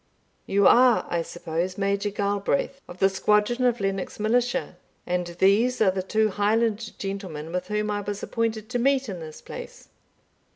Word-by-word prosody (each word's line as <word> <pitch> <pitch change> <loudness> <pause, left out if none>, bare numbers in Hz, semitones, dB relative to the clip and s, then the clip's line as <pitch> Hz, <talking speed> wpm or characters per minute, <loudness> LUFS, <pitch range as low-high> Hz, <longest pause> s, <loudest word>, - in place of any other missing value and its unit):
"You 200 0 +3
are, 250 -1 +6
I 170 - +1
suppose, 175 +2 -4
Major 200 +1 0
Galbraith, 205 +7 -1
of 175 - -10
the 195 - +4
squadron 210 +5 +1
of 240 -1 +2
Lennox 195 0 -3
Militia, 245 +4 0 0.3
and 180 0 -1
these 215 +7 +3
are 200 -4 +4
the 185 0 -2
two 215 +3 +1
Highland 215 +2 0
gentlemen 185 -6 -5
with 180 +1 -3
whom 210 0 -1
I 205 0 -1
was 205 0 -5
appointed 225 -2 -2
to 245 - -1
meet 270 +1 +2
in 185 -3 -5
this 155 -1 -9
place?" - - -10
205 Hz, 165 wpm, -25 LUFS, 190-230 Hz, 0.3 s, are